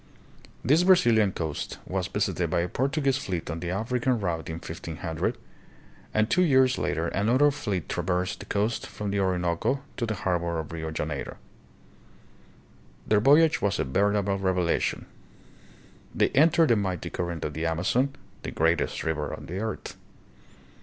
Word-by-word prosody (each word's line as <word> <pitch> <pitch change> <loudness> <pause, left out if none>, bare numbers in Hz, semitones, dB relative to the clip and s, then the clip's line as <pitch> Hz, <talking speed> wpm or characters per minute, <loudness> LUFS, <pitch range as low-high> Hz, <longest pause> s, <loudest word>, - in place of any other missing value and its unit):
This 150 +7 +5
Brazilian 120 - +5
coast 80 -4 -4
was - - -2
visited - - -1
by 85 - +1
a 85 - -1
Portuguese 135 - 0
fleet 90 - -4
on 80 - -4
the 85 0 -4
African 120 +5 0
route 85 -5 -2
in 80 - -3
1500, 80 -1 -4 0.7
and 110 0 +2
two 180 - +2
years 130 -6 +4
later 85 +1 -1
another 125 +9 +3
fleet 100 - -3
traversed 90 +1 -1
the - - -10
coast 105 +3 -1
from 105 -1 -5
the 100 - 0
Orinoco 90 +7 0
to 120 - -1
the 110 - -2
harbor 85 -3 -1
of 80 -2 -5
Rio 80 -1 -4
Janeiro. 75 -2 -4 1.7
Their 105 - +3
voyage 150 +7 +5
was 100 -2 +1
a - - +1
veritable 100 +6 +1
revelation. 90 -3 0 1.1
They - - +3
entered 160 +3 +4
the 115 - +5
mighty 95 -5 -2
current 85 -2 -3
of 75 - -4
the 80 +2 -2
Amazon, 115 - 0 0.3
the - - -5
great 80 +2 +2
est - - -3
river 75 -2 -2
of - - -7
the 90 +4 -5
earth. 110 +1 -4
95 Hz, 155 wpm, -27 LUFS, 85-125 Hz, 1.7 s, This